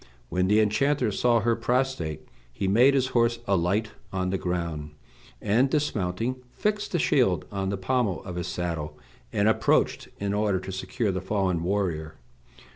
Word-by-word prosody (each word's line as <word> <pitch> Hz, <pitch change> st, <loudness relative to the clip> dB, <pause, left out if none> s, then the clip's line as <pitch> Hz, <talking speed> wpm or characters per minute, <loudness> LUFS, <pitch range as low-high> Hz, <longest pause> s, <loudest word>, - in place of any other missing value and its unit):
When 90 Hz, +1 st, +1 dB
the 105 Hz, +2 st, +4 dB
enchanter 125 Hz, +4 st, +2 dB
saw 120 Hz, +3 st, +2 dB
her 115 Hz, +1 st, +2 dB
prostrate 120 Hz, -, -1 dB, 0.2 s
he 95 Hz, +10 st, -3 dB
made 125 Hz, +8 st, +5 dB
his 130 Hz, -1 st, +2 dB
horse 115 Hz, -1 st, +2 dB
alight 100 Hz, +3 st, +1 dB, 0.2 s
on 95 Hz, -1 st, -1 dB
the 95 Hz, -, 0 dB
ground, 85 Hz, -4 st, -3 dB, 0.4 s
and, 115 Hz, +6 st, +2 dB
dismounting, 115 Hz, -4 st, -1 dB
fixed 210 Hz, +8 st, -2 dB
the -, -, +3 dB
shield 105 Hz, -, +2 dB
on 95 Hz, -1 st, -2 dB
the 100 Hz, -, -2 dB
pommel 110 Hz, 0 st, 0 dB
of 90 Hz, -2 st, -7 dB
his 90 Hz, -1 st, -3 dB
saddle, 80 Hz, -4 st, -3 dB, 0.3 s
and 105 Hz, 0 st, +2 dB
approached 110 Hz, -, +2 dB
in 100 Hz, 0 st, -1 dB
order 105 Hz, -2 st, +1 dB
to 95 Hz, +1 st, -7 dB
secure 105 Hz, +3 st, -2 dB
the 95 Hz, -1 st, -3 dB
fallen 95 Hz, -3 st, 0 dB
warrior. 85 Hz, -4 st, -1 dB
100 Hz, 160 wpm, -26 LUFS, 90-120 Hz, 0.4 s, made